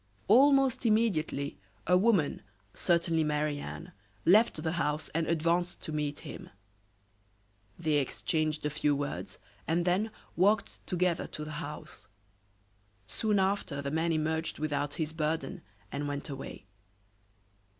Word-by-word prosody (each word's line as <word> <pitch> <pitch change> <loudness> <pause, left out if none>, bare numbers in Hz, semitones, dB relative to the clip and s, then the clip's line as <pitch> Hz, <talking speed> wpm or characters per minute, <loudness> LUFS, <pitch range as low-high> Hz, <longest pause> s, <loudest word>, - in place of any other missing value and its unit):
Almost 270 +3 +5
immediately 200 - +1 0.3
a 180 - +4
woman, 185 -6 +3 0.3
certainly 170 -2 +2
Marie 150 -1 0
Anne, 75 - -7 0.3
left 200 -4 +5
the 160 - 0
house 155 -3 -1
and 165 +1 -1
advanced 170 +2 +1
to - - -4
meet 150 -1 -2
him. - - -8 1.3
They 155 -3 +2
exchanged 155 +2 -1
a 150 - 0
few 150 0 +1
words 145 0 -4 0.3
and 170 +2 +1
then 190 +5 +2 0.3
walked 200 +3 +2
together 180 -2 +1
to 150 - -6
the 155 - -6
house. 150 -2 -7 1.0
Soon 210 - +1
after 190 -7 0
the 140 0 -3
man 160 +2 +1
emerged 160 +1 -1
without 145 -1 -1
his 155 -1 -2
burden 155 -3 -2 0.3
and 145 +1 -2
went 145 +2 -4
away. 135 -7 -7
160 Hz, 130 wpm, -31 LUFS, 150-180 Hz, 1.3 s, Almost